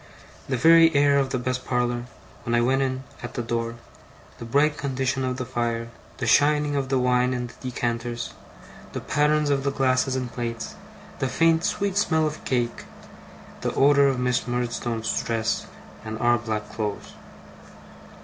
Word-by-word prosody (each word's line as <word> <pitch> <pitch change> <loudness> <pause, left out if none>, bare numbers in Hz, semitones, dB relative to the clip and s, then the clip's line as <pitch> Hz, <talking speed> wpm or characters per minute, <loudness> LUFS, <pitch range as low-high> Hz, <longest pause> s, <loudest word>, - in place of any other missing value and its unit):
The 130 - 0
very 165 +5 +7
air 140 0 +5
of 135 -1 0
the 130 - -1
best 130 +1 -2
parlour, 120 -1 -1 0.4
when 120 - 0
I 120 - +3
went 130 +3 +2
in 130 -1 -1 0.2
at 120 - -7
the 120 - -2
door, 115 0 -2 0.6
the 115 - -7
bright 145 +5 +2
condition 130 -1 -1
of 130 0 -2
the 130 - -3
fire, 115 -2 -2 0.3
the 130 - -3
shining 145 +4 +3
of 135 -2 -1
the 135 - +2
wine 125 0 +2
in 125 0 -2
the 120 - -10
decanters, 120 -2 -3 0.6
the - - -3
patterns 150 +1 +1
of 135 -1 +1
the 140 - +1
glasses 130 -1 +1
and 125 -2 -3
plates, 115 -2 -4 0.5
the 135 - 0
faint 165 +5 +3
sweet 200 -1 -1
smell 160 -6 +2
of 155 0 -4
cake, 120 -2 -1 0.8
the - - -2
odour 140 0 +5
of 135 -2 0
Miss 125 -1 0
Murdstone's 120 -2 -2
dress, 115 0 -1 0.4
and 110 0 -5
our 120 +1 +3
black 105 -2 -4
clothes. 105 -2 -4
125 Hz, 170 wpm, -25 LUFS, 120-140 Hz, 0.8 s, very